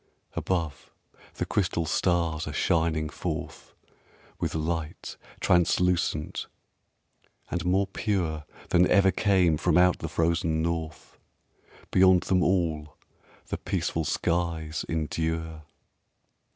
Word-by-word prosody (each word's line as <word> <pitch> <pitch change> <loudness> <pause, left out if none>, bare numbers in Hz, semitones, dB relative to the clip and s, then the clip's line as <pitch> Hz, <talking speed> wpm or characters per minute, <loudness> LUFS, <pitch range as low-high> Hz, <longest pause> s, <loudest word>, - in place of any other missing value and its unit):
Above, 85 -6 -3 0.4
the - - -2
crystal 90 -4 0
stars 85 -2 0
are 75 - -4
shining 80 0 +1
forth - - -6 0.6
With - - -2
light 80 0 -3 0.2
translucent 90 -3 +1 1.0
and 90 - -1
more 95 +2 +3
pure 90 -6 -2 0.2
Than 90 0 +4
ever 95 0 +5
came 95 -7 +3
from 85 +1 +2
out 90 0 +4
the - - -4
frozen 80 -1 +1
North; 80 -1 -4 0.7
Beyond 95 -1 +5
them 90 -1 +2
all, 80 -5 0 0.5
the - - -3
peaceful 80 - -1
skies 80 -1 -1
endure. 80 0 -2
85 Hz, 100 wpm, -27 LUFS, 80-90 Hz, 1.0 s, ever